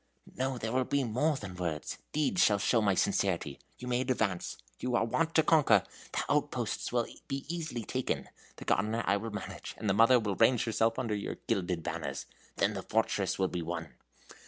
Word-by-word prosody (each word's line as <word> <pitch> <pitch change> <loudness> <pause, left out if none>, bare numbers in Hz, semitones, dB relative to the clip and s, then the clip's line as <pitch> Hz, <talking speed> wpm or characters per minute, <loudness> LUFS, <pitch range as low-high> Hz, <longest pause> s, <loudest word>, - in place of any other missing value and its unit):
"No, 130 0 -1
there 110 -1 -3
will 130 +1 +2
be 140 +2 +1
more 130 +7 +1
than 95 -6 -7
words. 85 -4 -3
Deeds 155 +5 +2
shall 105 - +4
show 115 +3 +2
my 100 -3 +3
sincerity. 90 -7 0 0.2
You 125 - -8
may 125 0 +1
advance. 110 -8 -1 0.2
You 125 -1 -1
are 120 - +3
wont 160 +8 0
to 160 - +6
conquer. 155 -2 +5 0.3
The - - 0
outposts - - 0
will - - +2 0.2
be 135 0 -3
easily 155 -9 -3
taken. 130 +3 -2 0.3
The - - -10
gardener 110 +3 +1
I 100 - +3
will 115 +3 -4
manage, 105 0 -6
and 110 - -4
the 95 - +4
mother 115 +5 +6
will 105 -3 -1
range 120 +2 +4
herself 115 -1 +1
under 120 -4 -1
your 100 -1 -3
gilded 90 -7 -1
banners. - - -4 0.3
Then - - +2
the - - -4
fortress - - 0
will 95 - +2
be 90 -1 -3
won!" 80 -1 -5
115 Hz, 195 wpm, -31 LUFS, 100-130 Hz, 0.3 s, to